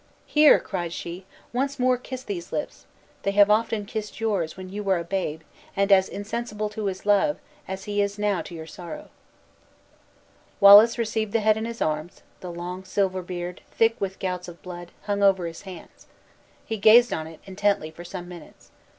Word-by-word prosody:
"Here," 300 0 +6
cried 175 -4 -4
she, 175 +2 -7 0.3
"once 275 +3 -1
more 255 0 +3
kiss 255 +1 -7
these 180 -7 -6
lips! 295 - -5 0.3
They - - 0
have 205 0 +6
often 220 -1 +1
kissed 215 0 -6
yours, 200 -8 -1
when 185 0 -8
you 205 +2 -5
were 195 -2 +1
a 170 - -3
babe; 170 -3 -3 0.4
and 200 +1 +2
as 190 -1 +5
insensible 215 0 -4
to 210 0 -5
his 190 0 -5
love, 205 +8 +3 0.3
as 190 0 -5
he 205 0 -1
is 200 0 -1
now 205 -4 0
to 170 - -9
your 160 -1 -7
sorrow." 180 - -9 1.5
Wallace 205 +4 +9
received 220 -2 -2
the 230 - +2
head 215 0 +4
in 220 +1 -3
his 230 0 -3
arms; 155 +2 -3 0.2
the 180 - -7
long 175 +2 -6
silver 190 -1 0
beard, 175 0 -6
thick 225 0 +2
with 195 -1 -3
gouts 180 -1 -3
of 170 -1 -10
blood, 175 -1 -8
hung 205 -1 -1
over 190 -3 +4
his 165 -1 -7
hands. 180 -3 -13 0.6
He 220 - -3
gazed 230 +4 +6
on 160 0 -3
it, 160 -1 -12
intently, 195 -4 0
for 170 +2 -11
some 175 0 -7
minutes. 175 -3 -13
200 Hz, 185 wpm, -25 LUFS, 180-215 Hz, 1.5 s, Wallace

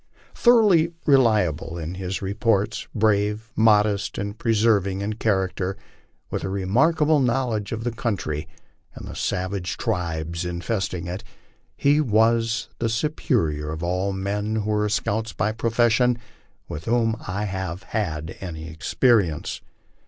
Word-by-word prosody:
Thoroughly 205 -9 +5
reliable 105 - +3
in 85 +1 -4
his 95 +1 -4
reports, 100 +1 0
brave, 105 +1 +1
modest, 105 -2 +3
and 100 +1 -3
persevering 105 -4 +2
in 105 +2 -2
character, 95 -3 -1 0.5
with - - -2
a 95 - -2
remarkable 145 - +2
knowledge 120 -5 0
of 115 0 -3
the 120 - -1
country 95 - -3 0.5
and - - -8
the - - -7
savage 90 -1 -2
tribes 85 -1 -2
infesting 90 0 -2
it, 90 +5 -5 0.5
he 145 +2 +4
was 115 -1 +2
the 115 - 0
superior 110 - 0
of 80 +2 -5
all 90 +3 0
men 100 +3 -2
who 110 -1 -1
were 105 0 +1
scouts 110 +1 -1
by 110 - 0
profession 120 +2 +2 0.5
with 75 +2 -6
whom 115 -1 +2
I 100 +3 -2
have 95 -2 -4
had 80 -8 -3
any 80 -4 -6
experience. 90 - +1
105 Hz, 130 wpm, -24 LUFS, 90-115 Hz, 0.5 s, Thoroughly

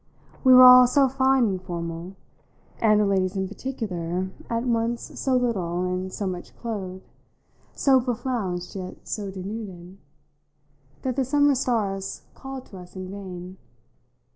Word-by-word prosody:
We 260 - +6
were 255 - +10
all 250 0 +10
so 275 +2 +4
fine 265 0 +3
and 190 -2 -2
formal, 170 +1 -6 0.6
and 215 -2 +4
the 210 - +3
ladies 190 -1 +1
in 190 -1 -1
particular 190 -6 -4 0.2
at 230 0 -1
once 235 -1 -2
so 265 -1 +1
little 185 -8 -1
and 185 +1 -3
so 200 - -4
much 180 -2 -6
clothed, 190 -5 -6 0.7
so 265 -2 +4
beflounced 220 -8 -3
yet 185 -1 -8
so 205 -2 -4
denuded, 190 -2 -7 1.0
that 255 -3 -1
the 270 - +2
summer 285 +2 +3
stars 210 -7 -2
called 270 -1 -8
to 195 - -9
us 180 +1 -13
in 185 0 -6
vain. 185 -2 -8
200 Hz, 140 wpm, -25 LUFS, 185-250 Hz, 1.0 s, were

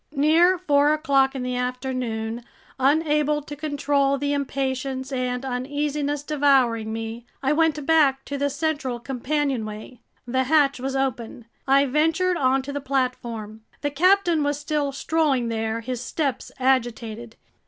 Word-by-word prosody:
Near 325 +6 +4
four 295 -4 +3
o'clock 275 -3 +2
in 260 - -3
the 250 0 -2
afternoon, 245 -2 -3 0.4
unable 300 +1 +2
to 295 0 -8
control 285 -2 0
the 285 +1 -1
impatience 265 -1 -2
and 250 0 -2
uneasiness 285 +3 -2
devouring 265 -7 +2
me, 225 +1 -6 0.2
I 270 +2 +2
went 310 -2 +1
back 280 -4 +3
to 285 - -5
the 285 0 0
central 285 -5 -2
companionway. 250 -3 -3 0.3
The 260 +2 0
hatch 280 -2 +3
was 265 +1 -3
open. 245 -3 -3 0.2
I 275 +1 +5
ventured 325 +6 +1
onto 265 0 +1
the 285 0 -4
platform. 240 -5 -3 0.2
The 290 - -1
captain 355 +1 +3
was 290 0 0
still 295 -1 -1
strolling 275 -4 0
there, 225 0 -2
his 245 +1 -4
steps 270 -1 -3
agitated. 235 -3 -1
270 Hz, 135 wpm, -24 LUFS, 250-295 Hz, 0.4 s, I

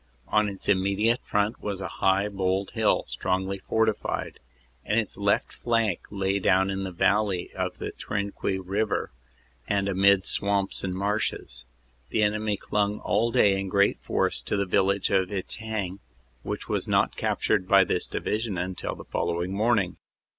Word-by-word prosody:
On 105 -1 +3
its 100 -1 -6
immediate 100 +4 +2
front 105 +2 0
was 100 -2 -3
a 95 - -3
high 95 +1 +3
bold 95 -1 -1
hill - - +2
strongly 95 +1 -2
fortified, 110 +1 -1 0.4
and 105 +7 +1
its 110 - -4
left 100 0 +1
flank 115 -6 0
lay 100 0 0
down 95 0 +3
in 95 0 -3
the 95 - -4
valley 95 +1 +1
of - - -3
the - - -4
Trinquis 100 -2 -3
river 100 +2 -1 0.6
and 100 -1 +1
amid 100 0 +4
swamps 100 -1 +1
and 95 -1 -2
marshes. 100 - -2 0.4
The 110 - +1
enemy 105 0 0
clung 105 +1 0
all 115 - +1
day 100 -4 +4
in 95 0 -3
great 100 +1 +3
force - - 0
to - - -2
the 100 - +1
village 95 +1 +1
of 95 -1 +2
Etaing 100 -1 -4 0.4
which - - -5
was - - -1
not - - +2
captured 95 - 0
by 100 0 +6
this 90 - -1
Division 105 -3 -2
until 90 0 -3
the - - -10
following 85 +2 -2
morning. 105 -3 +1
100 Hz, 155 wpm, -26 LUFS, 95-105 Hz, 0.6 s, by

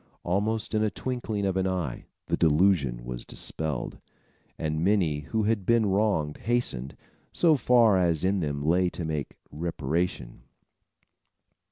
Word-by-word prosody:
Almost 105 +6 -1
in 110 - +2
the 110 - +2
twinkling 110 -2 -3
of 95 -1 0
an 95 0 +1
eye, 90 -9 -3 0.2
the - - 0
delusion 75 -7 +2
was - - -5
dispelled, 75 -5 -3 0.6
and 80 0 -2
many 90 -7 +2
who 110 +10 -2
had 105 -1 +1
been 115 +2 +3
wrong 95 -7 +1
hastened, 90 - -2 0.3
so 165 -3 +4
far 120 -6 +4
as 85 -3 +1
in 95 +1 +2
them 70 -3 -2
lay 90 +3 +3
to 85 - -6
make 75 -3 -3 0.2
reparation. 80 -4 -3
90 Hz, 140 wpm, -27 LUFS, 75-105 Hz, 0.6 s, so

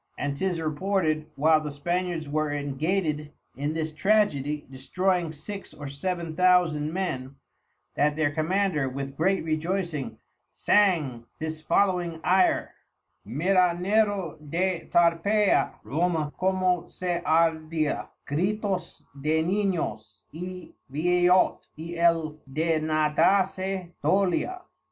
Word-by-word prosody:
And 145 -1 -2
'tis 180 +2 -1
reported, 155 -1 0
while 155 +2 +4
the 150 -1 -5
Spaniards 175 +2 -2
were 155 +1 0
engated 150 +2 -1 0.2
in 145 +3 -2
this 160 -1 -3
Tragedy 150 -7 +1
destroying 175 +5 -1
six 195 +7 -8
or 145 - -7
seven 165 +3 -4
thousand 175 -4 +3
Men, 140 -8 -3 0.6
that 150 0 +2
their 155 -2 +1
Commander 160 -2 0
with 135 +1 -5
great 185 +4 +1
rejoycing 155 - -2 0.4
sang 150 - +2
this 160 0 -5
following 175 -1 +1
Ayre; 185 +1 +3 0.5
Mira 175 - +2
Nero 200 -3 +1
de 175 +3 -2
Tarpeia, 175 +5 +3
Roma 160 -1 -1
como 185 -2 +1
se 175 -1 -3
ardia, 160 -1 +1 0.2
Gritos 190 +5 -2 0.2
de 160 +2 +2
Ninos 175 - -2
_y 180 +2 -7 0.2
Vieyot, 180 +4 +3
y 165 +2 -6
el 165 -2 +2
de 160 +2 +1
nadase 180 +4 +1
dolia. 200 - +1
165 Hz, 110 wpm, -26 LUFS, 150-185 Hz, 0.6 s, while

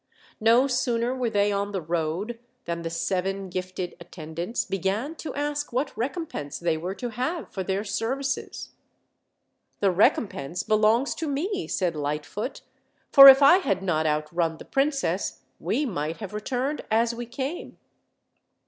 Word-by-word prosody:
No 230 +4 +5
sooner 245 -2 0
were 250 -2 -1
they 205 -1 +2
on 200 0 -2
the 190 - -1
road 170 +7 -2 0.3
than 170 0 -3
the 165 - -3
seven 190 +3 -2
gifted 185 0 -4
attendants 170 +6 -5
began 195 - -2
to 320 - -5
ask 290 0 -2
what 255 +5 -2
recompense 250 - -4
they 170 -2 0
were 180 +5 -4
to 245 - -4
have 260 +9 -3
for 190 - -3
their 190 +2 -1
services. 260 +6 -3 1.1
"The 195 -2 +3
recompense 180 -4 +1
belongs 215 +5 +3
tome," 295 -4 -3 0.3
said 180 -4 -1
Lightfoot; 150 - -4 0.5
"for 275 0 +11
if 270 +1 +10
I 315 +6 +8
had 195 - -1
not 160 -4 +1
outrun 160 +2 -1
the - - -11
princess, 275 +1 -1 0.2
we 295 - 0
might 165 - -3
have 205 -2 -7
returned 255 +7 -2
as 230 +2 +2
we 240 0 -6
came." 270 +7 -5
210 Hz, 145 wpm, -26 LUFS, 175-260 Hz, 1.1 s, for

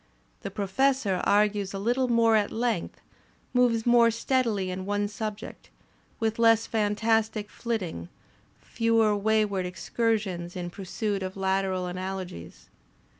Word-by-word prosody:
The - - -5
Professor 205 0 0
argues 205 -1 +2
a - - -2
little 245 +6 +1
more 230 -2 +4
at 210 -1 +2
length, 225 -6 -2 0.5
moves 240 -3 +2
more 240 -1 +6
steadily 230 -5 0
in 185 +1 -4
one 205 0 0
subject, 215 0 -7 0.5
with 225 -1 -1
less 225 -1 +5
fantastic 220 0 0
fiitting, 185 - -4 0.5
fewer 225 -2 +1
wayward 205 -2 +1
excursions 190 -2 -2
in 175 -1 -5
pursuit 200 +2 -3
of 185 +1 -5
lateral 190 -1 0
analogies. 180 - -6
210 Hz, 120 wpm, -27 LUFS, 190-230 Hz, 0.5 s, more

